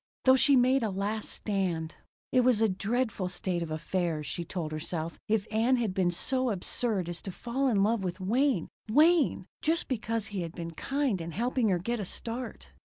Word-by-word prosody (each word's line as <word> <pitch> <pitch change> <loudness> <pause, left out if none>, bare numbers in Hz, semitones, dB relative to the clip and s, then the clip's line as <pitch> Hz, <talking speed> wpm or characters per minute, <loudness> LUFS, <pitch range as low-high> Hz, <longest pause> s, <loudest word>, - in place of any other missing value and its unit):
Though 260 0 +8
she 275 +1 +5
made 260 +1 +4
a 220 - 0
last 205 +3 -2
stand. 180 -6 -1 0.4
It 255 - +4
was 250 -3 +4
a 225 - +4
dreadful 210 0 -1
state 180 -1 -1
of 165 - -3
affairs, 160 0 -2
she 170 - -3
told 165 -2 -4
herself, 160 +1 -4
if 215 -1 +1
Ann 230 +4 +3
had 230 -6 0
been 185 -2 +2
so 255 +8 0
absurd 200 -1 -1
as 175 0 -3
to 190 - -5
fall 250 +8 -1
in 205 -6 +3
love 215 0 +1
with 185 +1 -3
Wayne 230 - +1 0.2
Wayne 310 +6 +4 0.2
just 330 +2 +1
because 230 -3 -2
he 190 - -1
had 165 -1 -5
been 170 -1 -5
kind 270 - -1
in 165 0 -6
helping 240 - +1
her 185 - +3
get 235 +7 -2
a 205 - -2
start. 235 +6 -5
210 Hz, 195 wpm, -29 LUFS, 175-245 Hz, 0.4 s, Though